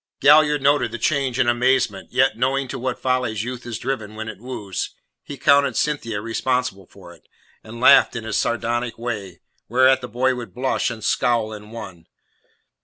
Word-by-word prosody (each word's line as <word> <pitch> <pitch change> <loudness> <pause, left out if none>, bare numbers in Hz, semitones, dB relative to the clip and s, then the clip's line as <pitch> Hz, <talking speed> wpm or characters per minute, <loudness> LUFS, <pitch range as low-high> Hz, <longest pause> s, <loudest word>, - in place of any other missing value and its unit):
Galliard 150 -1 +5
noted 140 -4 +3
the 120 - -4
change 135 0 0
in 130 -2 +2
amazement, 120 -3 +1
yet, 130 -3 +2
knowing 135 +3 0
to - - -5
what 130 0 -2
follies 125 -5 -1
youth 125 0 -6
is 115 -3 -4
driven 110 -5 -4
when 110 0 -5
it 100 -3 -9
woos, 105 -6 -5 0.3
he 145 - -9
accounted 140 +1 +3
Cynthia 115 -8 -1
responsible 115 -3 -2
for - - -14
it, - - -22 0.4
and 115 +1 -10
laughed 135 +1 +6
in 115 - -4
his 110 -2 -4
sardonic 120 0 -1
way, 105 -7 -5 0.3
whereat 130 +3 +4
the 125 - -6
boy 125 +3 +1
would 120 -2 -8
blush 130 +1 0
and 110 -3 -7
scowl 115 -1 +1
in 105 0 -10
one. 95 -7 -10
120 Hz, 180 wpm, -22 LUFS, 110-130 Hz, 0.4 s, laughed